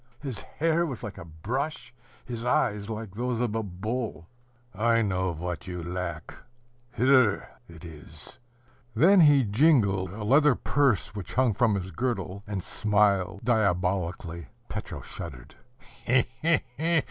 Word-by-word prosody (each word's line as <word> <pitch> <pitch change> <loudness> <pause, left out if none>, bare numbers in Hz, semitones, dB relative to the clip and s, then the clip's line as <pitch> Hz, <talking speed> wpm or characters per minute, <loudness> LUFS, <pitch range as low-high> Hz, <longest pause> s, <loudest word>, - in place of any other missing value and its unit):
His 130 -8 -5
hair 165 +2 0
was 135 -8 -5
like 105 -3 -7
a - - -9
brush, 125 - -4 0.3
his 120 -2 -5
eyes 105 -4 0
like 110 -3 -6
those 120 +2 -2
of 120 -3 0
a 115 - 0
bull. 110 0 -4 0.5
"I 115 +3 +2
know 95 -2 0
what 85 +3 -5
you 90 -2 -5
lack: 90 -2 -5 0.6
here 130 -5 +4 0.2
it 80 0 -12
is." 80 +6 -12 0.6
Then 180 - +6
he 145 -4 +6
jingled 105 - +3
a 105 +2 -6
leather 140 +4 +5
purse 130 -8 +1
which 100 -4 -7
hung 125 -3 +3
from 110 0 +2
his 95 -1 -4
girdle, 100 -6 -3
and 100 -3 -3
smiled 100 -2 +1
diabolically. 90 - 0 0.2
Petro - - -6
shuddered. - - -9
105 Hz, 130 wpm, -27 LUFS, 90-125 Hz, 0.6 s, Then